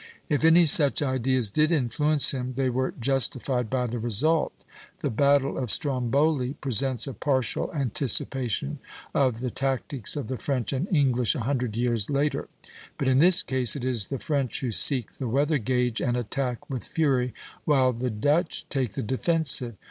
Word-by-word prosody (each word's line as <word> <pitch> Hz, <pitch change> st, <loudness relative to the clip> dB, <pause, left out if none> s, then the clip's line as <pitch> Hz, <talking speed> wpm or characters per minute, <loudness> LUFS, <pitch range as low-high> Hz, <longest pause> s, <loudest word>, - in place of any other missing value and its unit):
If 150 Hz, 0 st, 0 dB
any 165 Hz, +2 st, +6 dB
such 145 Hz, -1 st, +4 dB
ideas 130 Hz, -4 st, 0 dB
did 155 Hz, +5 st, +2 dB
influence 150 Hz, +1 st, +3 dB
him 130 Hz, -1 st, -4 dB
they 130 Hz, 0 st, -1 dB
were 130 Hz, +1 st, -1 dB
justified 125 Hz, -1 st, 0 dB
by 130 Hz, -1 st, -1 dB
the 120 Hz, 0 st, -4 dB
result. 125 Hz, +9 st, +1 dB, 0.4 s
The -, -, -2 dB
battle 140 Hz, +3 st, +1 dB
of 125 Hz, -3 st, -3 dB
Stromboli 135 Hz, 0 st, 0 dB
presents 130 Hz, -2 st, +1 dB
a 135 Hz, -, -6 dB
partial 130 Hz, -, -1 dB
anticipation 130 Hz, -, -1 dB, 0.3 s
of 125 Hz, -4 st, 0 dB
the 125 Hz, -1 st, -3 dB
tactics 135 Hz, -2 st, -2 dB
of 145 Hz, -7 st, -4 dB
the 130 Hz, -, -4 dB
French 135 Hz, -1 st, -2 dB
and 140 Hz, +7 st, -2 dB
English 130 Hz, -, +2 dB
a 135 Hz, -, -3 dB
hundred 125 Hz, -3 st, -2 dB
years 120 Hz, -4 st, 0 dB
later; 145 Hz, +1 st, -1 dB, 0.5 s
but 135 Hz, -, -2 dB
in 130 Hz, 0 st, +3 dB
this 175 Hz, +3 st, +5 dB
case 130 Hz, -4 st, 0 dB
it 130 Hz, -3 st, -5 dB
is 120 Hz, -6 st, +1 dB
the 135 Hz, -, -4 dB
French 140 Hz, -3 st, -2 dB
who 125 Hz, -3 st, -2 dB
seek 125 Hz, +1 st, +2 dB
the 130 Hz, -, -6 dB
weather 145 Hz, +5 st, +1 dB
gage 125 Hz, 0 st, -1 dB
and 120 Hz, -1 st, 0 dB
attack 125 Hz, +1 st, -3 dB
with 130 Hz, -3 st, -5 dB
fury, 130 Hz, -6 st, 0 dB, 0.3 s
while 130 Hz, -4 st, +2 dB
the 125 Hz, +2 st, -3 dB
Dutch 145 Hz, +10 st, -1 dB
take 130 Hz, -7 st, -2 dB
the -, -, -3 dB
defensive. 130 Hz, -1 st, +1 dB
130 Hz, 170 wpm, -25 LUFS, 120-145 Hz, 0.5 s, any